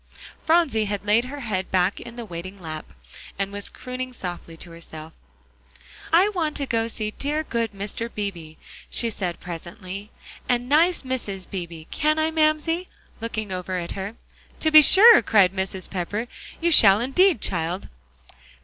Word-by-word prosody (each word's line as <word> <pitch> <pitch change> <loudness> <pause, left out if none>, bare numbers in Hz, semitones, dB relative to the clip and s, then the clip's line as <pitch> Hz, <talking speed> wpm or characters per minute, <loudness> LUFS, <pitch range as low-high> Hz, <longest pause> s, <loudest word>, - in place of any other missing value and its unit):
Phronsie 315 -10 +2
had 205 0 -4
laid 215 +4 +3
her 280 +2 -7
head 190 -6 -3
back 185 +2 +1
in 235 0 -10
the 240 -1 -7
waiting 185 +1 -8
lap, 155 -3 -8 0.5
and 195 0 -2
was 205 0 -3
crooning 255 0 -7
softly 175 -5 -7
to 170 - -10
herself. 160 -1 -11 1.0
"I 360 +5 +5
want 330 -7 -2
to 280 - -2
go 230 -3 0
and 230 0 -2
see 215 -1 -3
dear 295 +6 -2
good 230 -6 -2
Mr. 205 +3 -4
Beebe," 175 -7 -5 0.3
she 230 -1 +1
said 180 -5 -4
presently, 180 +4 -8 0.4
"and 245 0 +1
nice 325 +5 +3
Mrs. 215 -8 -4
Beebe, 170 -4 -6
can 305 +1 +1
I, 315 0 +1
Mamsie?" 320 +3 +1 0.3
looking 220 -3 -4
over 185 0 -3
at 170 -1 -4
her. 200 +3 -5 0.5
"To 315 - +2
be 310 0 +10
sure," 425 - +8
cried 195 -4 +4
Mrs. 190 -1 -3
Pepper, 205 +5 -3 0.3
"you 340 +1 +1
shall 200 -9 +7
indeed, 300 - +3
child." 175 0 -2
215 Hz, 160 wpm, -24 LUFS, 185-280 Hz, 1.0 s, be